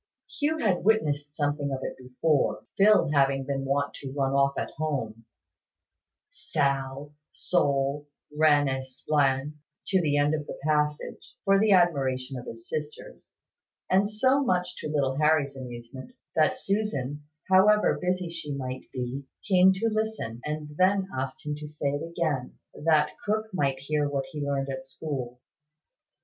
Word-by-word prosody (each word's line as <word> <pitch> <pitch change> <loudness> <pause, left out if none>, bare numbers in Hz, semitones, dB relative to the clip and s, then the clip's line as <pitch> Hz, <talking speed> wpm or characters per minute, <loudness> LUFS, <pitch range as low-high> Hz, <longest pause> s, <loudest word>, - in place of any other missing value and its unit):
Hugh 310 +2 +1
had 200 - +1
witnessed 150 -9 +1
something 145 -1 -1
of 135 -1 -3
it - - -4
before, 130 +4 0
Phil 195 -6 +5
having 135 -2 +2
been 135 0 -2
wont 140 +1 0
to 135 -2 -7
run 135 -1 0
off 140 0 +2
at - - -3
home, 125 -7 -3 1.1
"Sal, 140 - -2 0.2
Sol, 140 -3 0 0.3
Ren 150 -2 +4
et 130 0 -1
Splen," 140 +2 0 0.3
to 190 -1 +3
the 145 -3 +1
end 145 +1 +3
of 150 -2 -2
the - - -6
passage, 150 -1 -1
for 195 0 +5
the 215 -1 +4
admiration 135 -7 +2
of 125 -1 -7
his 115 0 -9
sisters, 150 0 -6 0.6
and 195 +2 +4
so 260 +6 +2
much 180 -7 0
to - - -5
little 140 -3 0
Harry's 150 -2 +2
amusement, 125 - -9 0.2
that 155 -1 +3
Susan, 150 -9 -2 0.2
however 205 +3 +5
busy 180 0 0
she 165 -4 -4
might 130 -1 -5
be, 130 +2 -4 0.2
came 190 -1 +6
to 195 +4 0
listen, 215 - -2
and 150 0 -4
then 190 +1 +3
asked 135 +4 -4
him 150 - -2
to 150 0 -7
say 150 -1 -2
it 145 +1 -3
again, 165 -6 -2 0.2
that 150 -1 +2
cook 215 0 -1
might 140 -7 +1
hear 145 +2 -1
what 140 -1 -2
he 150 -3 -5
learned 140 -1 -1
at 130 -1 -4
school. 130 -3 -5
145 Hz, 155 wpm, -27 LUFS, 135-175 Hz, 1.1 s, came